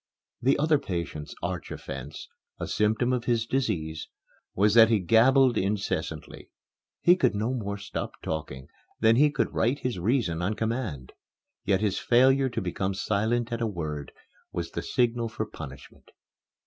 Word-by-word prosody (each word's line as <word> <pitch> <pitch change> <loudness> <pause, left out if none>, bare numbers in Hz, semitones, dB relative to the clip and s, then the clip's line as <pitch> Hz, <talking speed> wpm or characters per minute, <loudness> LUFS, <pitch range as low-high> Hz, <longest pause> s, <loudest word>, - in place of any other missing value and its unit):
The 130 +3 +3
other 150 0 +3
patient's 80 - -5
arch - - -3
offence - - -7 0.3
a - - -3
symptom 110 +4 +1
of 120 -2 -1
his 115 -2 +1
disease 85 -12 -2 0.5
was 105 +2 +3
that 115 -1 +8
he 115 - +4
gabbled 120 +6 +4
incessantly. 100 +1 -3 0.5
He 175 - +6
could 170 - +1
no 110 +5 -1
more 100 -5 -3
stop 100 0 -6
talking 70 -4 -5 0.3
than 110 0 +5
he 150 +2 +6
could 145 - -1
right 120 +5 +1
his 125 -9 -3
reason 95 -5 0
on 100 +5 -1
command. 110 - -3 0.5
Yet 95 0 +2
his 105 -3 0
failure 130 +2 +4
to 120 - -3
become 95 +1 -2
silent 110 +4 0
at 115 0 -3
a 115 - +1
word 75 -8 -5 0.4
was - - -4
the - - -3
signal 120 -1 0
for - - -3
punishment. 70 0 -11
110 Hz, 155 wpm, -27 LUFS, 95-120 Hz, 0.5 s, that